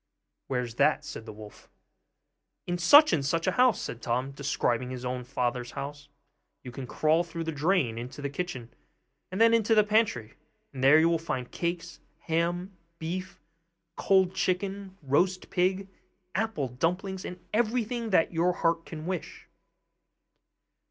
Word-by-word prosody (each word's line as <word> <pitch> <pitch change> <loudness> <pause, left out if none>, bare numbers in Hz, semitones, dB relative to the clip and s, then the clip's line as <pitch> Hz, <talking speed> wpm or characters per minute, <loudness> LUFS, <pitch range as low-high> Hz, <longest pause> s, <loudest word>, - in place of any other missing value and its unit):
'Where's 125 -3 -2
that?' 150 -1 +3
said 115 -5 -8
the - - -6
wolf. 105 0 -13 1.0
'In 175 0 -2
such 290 - +7
and 150 -4 +1
such 165 +4 0
a 185 - +2
house,' 250 +2 +3
said 120 - -6
Tom, 125 +3 -1
describing 130 -3 -1
his 130 -1 -6
own 125 0 -3
father's 125 -1 -2
house. 145 +1 -7 0.5
'You 125 - -8
can 130 0 -7
crawl 155 +6 +2
through 165 -1 -6
the 165 - -3
drain 150 -7 +1
into 125 +4 -8
the 145 - -2
kitchen 140 -7 -5 0.6
and 190 - -4
then 230 0 +6
into 225 -1 +3
the 215 - +6
pantry, 210 - +1 0.4
and 130 -1 -5
there 140 +3 +7
you 160 - +4
will 170 -1 +2
find 130 -6 -4
cakes, 170 0 -4 0.2
ham, 175 +3 -1 0.2
beef, 185 +4 -5 0.6
cold 190 -2 +3
chicken, 190 +1 -2
roast 180 +7 +1
pig, 185 +2 +1 0.5
apple 220 -11 -1
dumplings, 180 +9 -2
and 180 - -7
everything 235 +1 0
that 180 -3 +2
your 170 +2 +2
heart 165 -1 0
can 155 -1 -7
wish. 180 -1 -5
165 Hz, 150 wpm, -28 LUFS, 135-190 Hz, 1.0 s, such